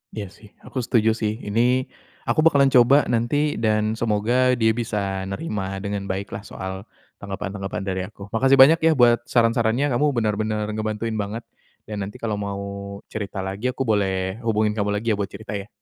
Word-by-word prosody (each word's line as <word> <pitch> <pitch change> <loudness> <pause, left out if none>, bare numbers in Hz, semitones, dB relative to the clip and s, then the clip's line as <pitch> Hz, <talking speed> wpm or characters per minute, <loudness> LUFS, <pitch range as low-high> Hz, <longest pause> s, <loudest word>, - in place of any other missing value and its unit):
Iya 105 -2 -4
sih, 105 - -16 0.2
aku - - -9
setuju 110 -2 +3
sih. 105 0 +1
Ini, 105 +3 0 0.7
aku - - +1
bakalan 140 -4 +5
coba 130 +4 +6
nanti 120 +4 0 0.3
dan 110 0 +2
semoga 120 +4 +2
dia 110 -1 +3
bisa, 115 -2 -3 0.3
nerima 100 -1 -3 0.2
dengan 100 -1 -3
baiklah 100 +2 -5
soal 95 +2 -7 0.3
tanggapan-tanggapan 95 -1 -5
dari 95 -1 -2
aku. 100 -1 -12
Makasih 135 +4 +4
banyak 160 +5 +7
ya - - +6
buat, 120 -2 +5
saran-sarannya! 115 +3 +2
Kamu 125 +5 +2
benar-benar 110 -1 0
ngebantuin 110 +1 -3
banget, 105 +3 -4 0.4
dan 105 -2 -5
nanti 105 - -10
kalau 105 -2 -1
mau 100 -1 -4 0.5
cerita 100 -2 -4
lagi, 95 +5 -3
aku 130 +1 -1
boleh 95 -3 0
hubungin 110 -1 +2
kamu 105 0 0
lagi 110 +2 -1
ya, - - +2
buat 100 - -1
cerita 110 - -8
ya? 100 - -9
110 Hz, 170 wpm, -23 LUFS, 100-120 Hz, 0.7 s, banyak